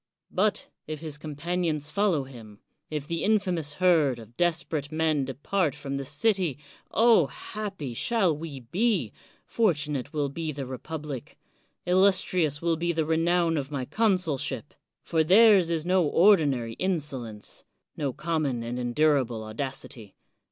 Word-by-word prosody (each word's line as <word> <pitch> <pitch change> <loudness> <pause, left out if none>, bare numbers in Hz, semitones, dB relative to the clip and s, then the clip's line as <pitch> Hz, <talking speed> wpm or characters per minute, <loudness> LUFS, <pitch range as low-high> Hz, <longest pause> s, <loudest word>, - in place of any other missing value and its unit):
But - - 0 0.2
if 155 -1 -5
his 155 -2 -7
companions 155 0 -2
follow 200 -8 +1
him, 115 -6 -12 0.2
— - - -46
^if 150 -2 -3
the 165 +2 -3
in 215 +2 +4
famous 175 -7 -2
herd 160 -7 +3
of 115 0 -13
desperate 165 -3 -1
men 155 -3 +1
depart 145 +4 -1
from 140 -2 -4
the 140 - -4
city, 180 - 0 0.3
oh! 225 -9 +5
happy 195 - -6
shall 190 - +1
we 150 -3 -7
be, 175 - 0 0.3
fortunate 150 - 0
will 145 -3 -1
be 155 +2 -4
the 140 -2 -5
republic, 135 +1 -7 0.5
illustrious 180 -5 +2
will 165 -1 +1
be 170 +1 0
the 160 -2 0
renown 165 +1 +2
of 140 -2 -3
my 140 -4 -3
consulship. 185 - -1 0.3
For 160 -1 +1
theirs 195 0 +6
is 165 -1 -1
no 185 0 +3
ordinary 145 - +3
insolence, 140 - -4 0.2
— - - -57
^no 140 -4 -2
common 155 -7 -1
and 120 +2 -4
endurable 125 -2 +1
audacity. 110 -2 -6
155 Hz, 145 wpm, -27 LUFS, 135-175 Hz, 0.5 s, theirs